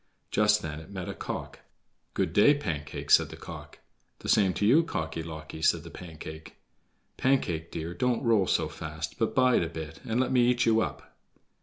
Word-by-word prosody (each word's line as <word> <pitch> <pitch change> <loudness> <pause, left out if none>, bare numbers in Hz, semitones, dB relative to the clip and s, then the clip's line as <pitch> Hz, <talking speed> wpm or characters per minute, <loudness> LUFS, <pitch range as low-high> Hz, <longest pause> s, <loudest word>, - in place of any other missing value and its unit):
Just 105 0 +3
then 75 -1 -5
it 80 - -12
met 95 -3 -6
a - - -4
cock. - - -6 0.6
"Good 90 -4 0
day, 125 +10 +6
Pancake," 80 - -4
said - - +6
the - - -9
cock. - - -10 0.4
"The - - -7
same 100 -3 +4
to 100 - 0
you, 135 +10 +6
Cocky 80 - -3
locky," 80 -1 -8
said 80 0 +3
the 85 - -10
Pancake. 80 -2 -9 0.6
"Pancake, 85 -12 +1
dear, 80 +2 -5
don't 125 +7 0
roll 110 -6 +3
so 80 - +2
fast, 80 +1 -6
but 115 - 0
bide 130 -1 +4
a 85 - -2
bit 80 -1 -7
and 115 +2 -1
let 130 - +1
me 125 -2 +4
eat 125 0 +2
you 115 -1 +4
up." - - -5
90 Hz, 190 wpm, -28 LUFS, 80-115 Hz, 0.6 s, day